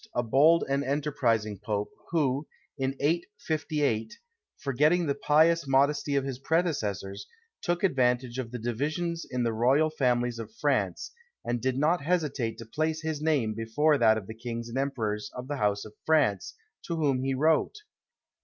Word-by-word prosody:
a 120 Hz, -, +1 dB
bold 150 Hz, +8 st, +5 dB
and 140 Hz, +1 st, 0 dB
enterprising 125 Hz, -8 st, 0 dB
Pope, 105 Hz, 0 st, -3 dB, 0.2 s
who, 145 Hz, -3 st, 0 dB, 0.3 s
in 135 Hz, -1 st, -2 dB
858, 150 Hz, -, -1 dB, 0.4 s
forgetting 150 Hz, +6 st, +2 dB
the 140 Hz, -, +1 dB
pious 155 Hz, +3 st, +3 dB
modesty 140 Hz, +1 st, +2 dB
of 140 Hz, -, +2 dB
his 135 Hz, -2 st, -5 dB
predecessors, 105 Hz, -, -1 dB, 0.3 s
took 175 Hz, +1 st, -1 dB
advantage 125 Hz, -6 st, +1 dB
of 125 Hz, -3 st, -4 dB
the 125 Hz, -, -5 dB
divisions 155 Hz, +9 st, -2 dB
in 125 Hz, -1 st, -1 dB
the 115 Hz, -1 st, 0 dB
royal 135 Hz, +8 st, +3 dB
families 125 Hz, -4 st, 0 dB
of 115 Hz, -, -8 dB
France, -, -, 0 dB, 0.3 s
and 120 Hz, -1 st, -1 dB
did 130 Hz, 0 st, 0 dB
not 160 Hz, +5 st, +2 dB
hesitate 145 Hz, -8 st, -1 dB
to 115 Hz, -, -8 dB
place 155 Hz, +6 st, -2 dB
his 155 Hz, -2 st, -3 dB
name 145 Hz, -9 st, +1 dB
before 140 Hz, +7 st, +1 dB
that 110 Hz, -1 st, +5 dB
of 105 Hz, -, -5 dB
the 110 Hz, -, -7 dB
kings 115 Hz, 0 st, -6 dB
and 120 Hz, -, -5 dB
emperors 110 Hz, -7 st, -2 dB
of 125 Hz, +1 st, -6 dB
the 145 Hz, 0 st, -3 dB
house 105 Hz, -4 st, 0 dB
of 110 Hz, -, -11 dB
France, 140 Hz, -12 st, +1 dB, 0.3 s
to 170 Hz, -, -4 dB
whom 140 Hz, -5 st, +1 dB
he 135 Hz, 0 st, -1 dB
wrote. 155 Hz, -, +2 dB
135 Hz, 165 wpm, -28 LUFS, 115-155 Hz, 0.4 s, bold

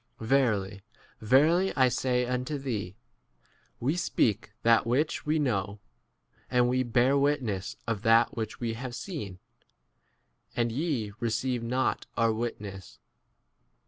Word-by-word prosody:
Verily, 110 Hz, -6 st, +1 dB, 0.4 s
verily, 155 Hz, -, +4 dB
I 130 Hz, -2 st, +5 dB
say 125 Hz, 0 st, 0 dB
unto 125 Hz, +4 st, -2 dB
thee, 110 Hz, -9 st, -4 dB, 0.8 s
"We 140 Hz, +7 st, 0 dB
speak 110 Hz, -, 0 dB
that 115 Hz, 0 st, +4 dB
which 145 Hz, +6 st, 0 dB
we 155 Hz, +1 st, +2 dB
know, 105 Hz, -8 st, -1 dB, 0.7 s
and 125 Hz, -1 st, +3 dB
we 130 Hz, +1 st, +1 dB
bear 125 Hz, +2 st, +2 dB
wit 140 Hz, 0 st, +2 dB
ness 100 Hz, -4 st, -3 dB
of 115 Hz, -4 st, -2 dB
that 115 Hz, 0 st, +4 dB
which 110 Hz, -2 st, -4 dB
we 115 Hz, -2 st, -2 dB
have 120 Hz, +1 st, -6 dB
seen, 120 Hz, -, -6 dB, 1.2 s
12 -, -, -18 dB
and 120 Hz, -1 st, +1 dB
ye 125 Hz, -6 st, -2 dB
receive 120 Hz, +1 st, -1 dB
not 125 Hz, +3 st, -1 dB
our 115 Hz, -1 st, +3 dB
witness. 105 Hz, -5 st, -6 dB
120 Hz, 130 wpm, -28 LUFS, 110-130 Hz, 1.2 s, I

